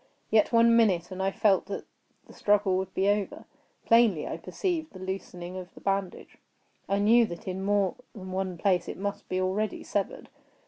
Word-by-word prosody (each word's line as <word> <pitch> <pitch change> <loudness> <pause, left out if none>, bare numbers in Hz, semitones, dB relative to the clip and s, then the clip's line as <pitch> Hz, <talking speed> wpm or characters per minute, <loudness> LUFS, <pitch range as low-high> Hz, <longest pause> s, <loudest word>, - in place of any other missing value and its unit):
Yet 215 -2 +4
one 230 0 +5
minute, 190 -7 +3
and 185 0 -5
I 190 - +2
felt 195 -1 +2
that 200 - -5 0.4
the - - -15
struggle 205 -2 +2
would 190 0 -3
be 195 - +1
over. 205 -1 -1 0.4
Plainly 230 -9 +4
I - - -4
perceived 335 - -3
the 185 - -10
loosening 185 -1 -6
of 185 0 -8
the - - -11
bandage. 195 -2 -3 0.5
I 200 - +2
knew 225 +3 +5
that 170 -1 -9
in 190 +1 -3
more 200 -2 +2 0.2
than 190 -3 -8
one 185 -1 -2
place 180 -1 +1
it - - -6
must 200 +1 -4
be 185 - 0
already 195 +3 -1
severed. 200 -2 -3
195 Hz, 185 wpm, -28 LUFS, 185-210 Hz, 0.5 s, one